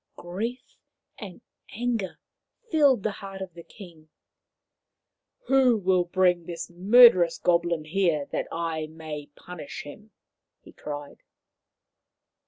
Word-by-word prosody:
Grief 225 Hz, +9 st, -6 dB, 0.4 s
and 195 Hz, -5 st, -9 dB, 0.4 s
anger 230 Hz, -6 st, -2 dB, 0.5 s
filled 285 Hz, -, +4 dB
the 215 Hz, -, 0 dB
heart 195 Hz, -1 st, -9 dB
of 190 Hz, -2 st, -7 dB
the 170 Hz, -, -11 dB
king. 170 Hz, -4 st, -15 dB, 0.7 s
" -, -, -49 dB
Who 260 Hz, -3 st, +4 dB
will 185 Hz, -2 st, +1 dB
bring 180 Hz, -1 st, +1 dB
this 175 Hz, 0 st, -6 dB
murderous 185 Hz, -1 st, +6 dB
goblin 170 Hz, -2 st, +1 dB
here 165 Hz, -3 st, 0 dB
that -, -, -2 dB
I 165 Hz, -2 st, -3 dB
may 155 Hz, -2 st, -8 dB
punish 150 Hz, -7 st, -9 dB
him 210 Hz, +9 st, -12 dB, 0.3 s
?" -, -, -61 dB
he -, -, -15 dB
cried. 145 Hz, -1 st, -8 dB
180 Hz, 120 wpm, -26 LUFS, 165-210 Hz, 0.7 s, murderous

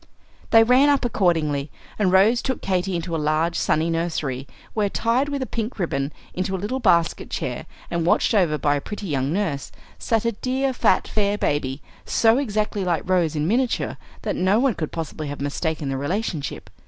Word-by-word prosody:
They 225 Hz, 0 st, +7 dB
ran 255 Hz, +5 st, +5 dB
up 280 Hz, -3 st, +2 dB
accordingly, 160 Hz, -10 st, +1 dB, 0.3 s
and 195 Hz, -3 st, +3 dB
Rose 210 Hz, +6 st, +5 dB
took 260 Hz, -2 st, -2 dB
Katy 185 Hz, -1 st, 0 dB
into 170 Hz, 0 st, -3 dB
a 160 Hz, -, -1 dB
large 155 Hz, +3 st, +1 dB
sunny 155 Hz, +2 st, +1 dB
nursery, 155 Hz, -6 st, -2 dB, 0.3 s
where, 210 Hz, -2 st, +1 dB
tied 240 Hz, +7 st, +1 dB
with 275 Hz, -3 st, -3 dB
pink 230 Hz, +1 st, -3 dB
ribbon 150 Hz, -7 st, -1 dB, 0.2 s
into 185 Hz, +1 st, -2 dB
a -, -, -1 dB
little 210 Hz, +8 st, -3 dB
basket 170 Hz, -8 st, +2 dB
chair -, -, -4 dB, 0.2 s
and 170 Hz, -1 st, 0 dB
watched 175 Hz, -, +2 dB
over 175 Hz, -8 st, +3 dB
by 145 Hz, -1 st, +2 dB
a 145 Hz, -, -1 dB
pretty 210 Hz, +4 st, -6 dB
young 140 Hz, -5 st, -1 dB
nurse, 165 Hz, -7 st, -2 dB, 0.3 s
sat 225 Hz, -1 st, 0 dB
a 230 Hz, -, +2 dB
dear, 260 Hz, +4 st, -1 dB
fat, -, -, +2 dB
fair 205 Hz, -1 st, 0 dB
baby, 135 Hz, -5 st, -1 dB, 0.2 s
so 230 Hz, +2 st, +3 dB
exactly 215 Hz, -5 st, -1 dB
like 175 Hz, -3 st, -1 dB
Rose 175 Hz, -4 st, +2 dB
in 150 Hz, +1 st, 0 dB
miniature 245 Hz, +5 st, 0 dB, 0.3 s
that -, -, -1 dB
no 185 Hz, +3 st, +3 dB
one 265 Hz, -1 st, +3 dB
could 155 Hz, -5 st, -4 dB
possibly 155 Hz, -2 st, -5 dB
have 145 Hz, 0 st, -6 dB
mistaken 145 Hz, +1 st, -2 dB
the 135 Hz, -, -1 dB
relationship. 160 Hz, +1 st, -3 dB
185 Hz, 185 wpm, -23 LUFS, 155-225 Hz, 0.3 s, They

